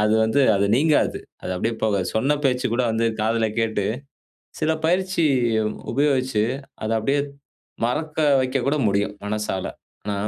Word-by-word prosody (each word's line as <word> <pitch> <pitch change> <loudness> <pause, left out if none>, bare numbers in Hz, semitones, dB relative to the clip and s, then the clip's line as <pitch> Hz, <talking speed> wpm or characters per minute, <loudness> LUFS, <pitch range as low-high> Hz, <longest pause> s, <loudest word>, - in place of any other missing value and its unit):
அது 105 +1 +3
வந்து, 110 +6 +2
அது 100 0 +2
நீங்காது. 150 +3 +2 0.2
அது - - -4
அப்படியே 115 +5 -1
போகாது. 100 -4 +1
சொன்ன 140 +6 +2
பேச்சு 130 -1 +2
கூட 125 +2 +1
வந்து 115 +1 +1
காதில 110 +1 +1
கேட்டு, 110 -3 0 0.8
சில 160 0 +1
பயிற்சி 185 0 +1 0.7
உபயோகிச்சு, 130 -4 +1 0.4
அத 110 - -2
அப்படியே 140 +6 +1 0.7
மறக்க 155 +5 -2 0.2
வைக்க 130 +1 0
கூட 150 +2 +2
முடியும். 100 +1 0
மனசால. 105 -3 -2 0.4
ஆனா, 105 -1 -2
115 Hz, 140 wpm, -23 LUFS, 105-145 Hz, 0.8 s, அது